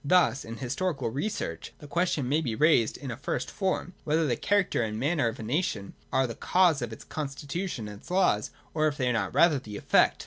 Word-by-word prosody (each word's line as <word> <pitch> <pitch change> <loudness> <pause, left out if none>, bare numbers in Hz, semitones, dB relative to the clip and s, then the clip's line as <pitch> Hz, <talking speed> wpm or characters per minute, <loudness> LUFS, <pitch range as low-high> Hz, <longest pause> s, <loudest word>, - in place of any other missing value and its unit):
Thus 145 -3 +3
in 115 +1 -7
historical 135 +2 -2
research 200 - -3
the 150 - -12
question 165 -4 0
may 150 +5 +2
be 120 -8 -2
raised 150 -5 +4
in 135 -3 -6
a - - -4
first 130 -1 -3
form, 190 -2 -1
whether 160 +2 +2
the 125 -5 +1
character 200 - +1
and 110 -1 -2
manners 145 -2 +2
of - - -17
a - - -5
nation 120 - -1 0.2
are 130 - +3
the 115 - -4
cause 175 +2 +3
of 120 -2 -3
its 110 - -9
constitution 145 - -4
and 105 -1 -9
its - - -16
laws, 180 - +2 0.2
or 155 -1 +2
if 145 -1 -2
they 130 - 0
are - - +1
not 100 -5 -1
rather 160 -5 +5
the 105 -5 -8
effect. - - +3
140 Hz, 220 wpm, -28 LUFS, 120-170 Hz, 0.2 s, rather